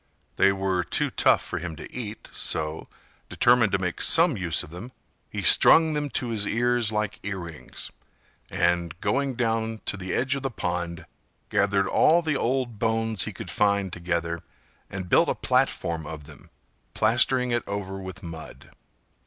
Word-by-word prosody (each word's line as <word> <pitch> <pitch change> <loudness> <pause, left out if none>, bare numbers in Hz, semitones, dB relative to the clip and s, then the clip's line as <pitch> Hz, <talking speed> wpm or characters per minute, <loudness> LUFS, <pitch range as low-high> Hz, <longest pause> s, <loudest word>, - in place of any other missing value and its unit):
They 100 - +5
were 95 -2 -1
too - - -1
tough - - +3
for - - -4
him 85 -2 -6
to - - -11
eat, 110 -3 -6
so, 75 +1 -1 0.4
determined 120 -4 +4
to - - +4
make 90 -2 -3
some 165 -3 +5
use 85 -6 0
of - - -12
them, 90 +9 -9 0.4
he - - -5
strung 160 -1 +6
them 150 -1 -2
to 125 -2 -2
his 105 -3 -1
ears 120 -1 +1
like 105 0 -2
earrings, 90 -6 -6 0.6
and, 85 -1 0
going 135 +2 0
down 115 -2 -1
to 105 - -3
the 95 -1 -6
edge 130 +3 +1
of 140 - -3
the 135 - -2
pond, 85 -6 -4 0.4
gathered 100 -1 +2
all 170 - +4
the 155 -3 0
old 125 -4 -1
bones 115 -2 0
he - - -4
could - - -8
find 100 -3 +1
together 85 -1 -2 0.5
and 95 -1 -6
built - - +4
a - - 0
platform 80 -2 0
of 80 -2 -7
them, - - -15 0.5
plastering 125 +3 +3
it 120 0 +1
over 95 -1 -4
with 95 +2 -9
mud. 80 -2 -10
100 Hz, 165 wpm, -25 LUFS, 90-120 Hz, 0.6 s, strung